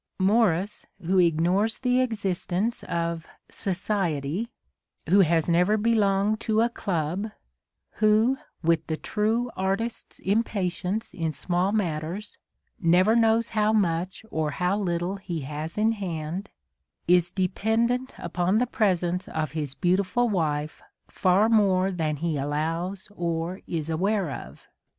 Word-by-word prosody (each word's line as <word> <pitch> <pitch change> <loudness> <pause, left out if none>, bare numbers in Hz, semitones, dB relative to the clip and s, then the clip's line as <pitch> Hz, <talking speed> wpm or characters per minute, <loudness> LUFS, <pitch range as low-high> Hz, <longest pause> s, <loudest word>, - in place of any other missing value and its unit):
Morris, 200 -1 +2 0.2
who 185 +3 +2
ignores 180 +6 +2
the 250 0 +2
existence 205 -2 -1
of 170 -1 -2 0.3
"society", 185 -2 -1 0.6
who 200 - +5
has 165 -3 +3
never 180 +5 +3
belonged 210 -1 +2
to 220 -1 0
a 235 - +3
club, 185 -1 -2 0.3
— - - -57
who, 215 +4 +4 0.3
with 165 -1 +2
the 160 - -2
true 225 +6 -1
artist's 195 +5 -2
impatience 200 0 -1
in 165 -2 -2
small 175 +6 0
matters, 180 0 -3 0.4
never 185 +5 +4
knows 230 0 +3
how 215 -1 +2
much 185 -1 0
or 155 -1 0
how 180 +5 0
little 180 -1 -1
he 175 -4 -5
has 150 +5 -6
in 220 +1 +3
hand, 180 -2 -4 0.6
is 175 0 +4
dependent 225 +7 0
upon 175 +3 -1
the 240 +3 +3
presence 180 -6 0
of 155 -1 -3
his 150 -4 -3
beautiful 190 - +1
wife 155 -7 -1 0.3
far 190 +4 +3
more 195 -4 +3
than 160 -4 -1
he 160 +1 -2
allows 165 +7 -2
or 170 +1 -2
is 160 -3 -2
aware 185 +1 0
of. - - -9
185 Hz, 125 wpm, -26 LUFS, 165-215 Hz, 0.6 s, who